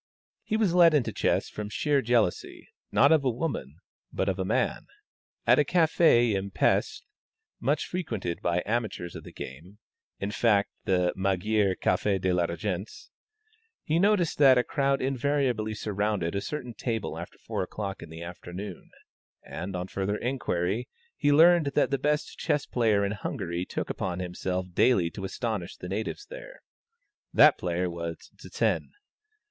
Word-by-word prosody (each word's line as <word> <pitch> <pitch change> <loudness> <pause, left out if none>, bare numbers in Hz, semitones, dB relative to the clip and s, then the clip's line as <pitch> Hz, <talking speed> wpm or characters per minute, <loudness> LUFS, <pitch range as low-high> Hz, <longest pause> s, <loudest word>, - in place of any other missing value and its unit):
He 215 - -1
was 210 -6 +2
led 170 -3 +6
into 135 -6 +1
chess - - +1
from 105 -1 -6
sheer 145 +6 +1
jealousy, 115 -6 0 0.2
not - - +5
of 160 -2 +5
woman, 130 +5 -2 0.4
but - - -1
of - - -1
a - - +1
man. - - -1 0.6
At - - +5
a - - +5
café 160 -9 +4
in 100 0 -2
Pesth, - - +1 0.6
much 145 +4 0
frequented 110 - -4
by 85 0 0
amateurs 105 -6 -2
of - - -8
the - - -11
game, 80 +10 -9 0.4
in 100 +1 -3
fact 105 -2 +2
the 90 -2 +2
Magyar 95 +1 +1
Café 95 +2 +1
de 95 0 +1
la 90 -1 +2
Régence, 90 +4 -5 0.7
he 160 +2 +1
noticed 195 -5 +2
that 135 -3 +7
a 125 - +4
crowd 135 0 0
invariably 130 -5 0
surrounded 105 -4 -1
a 100 - -1
certain 125 -1 -5
table 115 -2 -3
after - - -8
4 - - -4
o'clock 95 +1 -5
in 85 - -9
the 80 +1 -8
afternoon; 90 +2 -8 0.6
and, 90 +3 -6
on 90 0 -3
further 100 +2 -2
inquiry, 115 -4 -2 0.3
he 145 - +2
learned 165 +1 +6
that - - +2
the 140 - +1
best 150 +2 -1
chess 145 - 0
player 110 -4 +2
in 100 - -1
Hungary 90 -4 -3
took - - -4
upon 90 -2 -3
himself 90 0 -3
daily 90 -6 +3
to 95 - -6
astonish 100 -3 -3
the - - -7
natives 110 - -4
there. - - -11 0.7
That - - +6
player 90 0 -1
was 85 -1 -6
Zsen. - - -2
105 Hz, 155 wpm, -27 LUFS, 90-135 Hz, 0.7 s, that